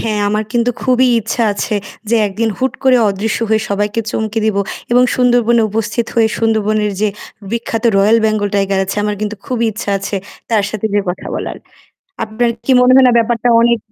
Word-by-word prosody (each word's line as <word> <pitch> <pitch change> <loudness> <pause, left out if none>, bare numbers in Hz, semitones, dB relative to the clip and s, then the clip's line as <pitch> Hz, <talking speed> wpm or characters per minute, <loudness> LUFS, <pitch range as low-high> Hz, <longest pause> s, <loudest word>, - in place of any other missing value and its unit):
হ্যাঁ, 215 -2 -1
আমার 215 +1 -1
কিন্তু 240 0 +1
খুবই 255 0 +3
ইচ্ছা 225 +2 -2
আছে 200 +1 -3 0.3
যে 235 - +3
একদিন 215 +3 -2
হুট 260 0 0
করে 260 -1 +5
অদৃশ্য 200 +2 -2
হয়ে 220 0 +2
সবাইকে 205 +2 -1
চমকে 220 +1 -2
দিব 215 -2 0 0.4
এবং 245 - +5
সুন্দরবনে 240 -2 +3
উপস্থিত 225 +2 -2
হয়ে 225 -1 +3
সুন্দরবনের 215 -2 +1
যে 215 - +2 0.4
বিখ্যাত 235 0 -3
royal 210 +3 +4
Bengal 215 -2 +1
tiger 195 -1 +1
আছে 195 - -4
আমার 210 0 -1
কিন্তু 215 0 -3
খুবই 240 -2 -1
ইচ্ছা 210 -1 -5
আছে 195 +1 -4 0.3
তার 215 -3 +2
সাথে 215 0 -3
যে 205 - +3
কথা 180 - -4
বলার। - - -4 0.7
আপনার 230 +2 -1
কি 270 - +2
মনে 250 +1 +5
হয় 265 - +6
না 245 - +4
ব্যাপারটা 230 +1 0
অনেক 235 0 +3
220 Hz, 185 wpm, -15 LUFS, 210-235 Hz, 0.7 s, হয়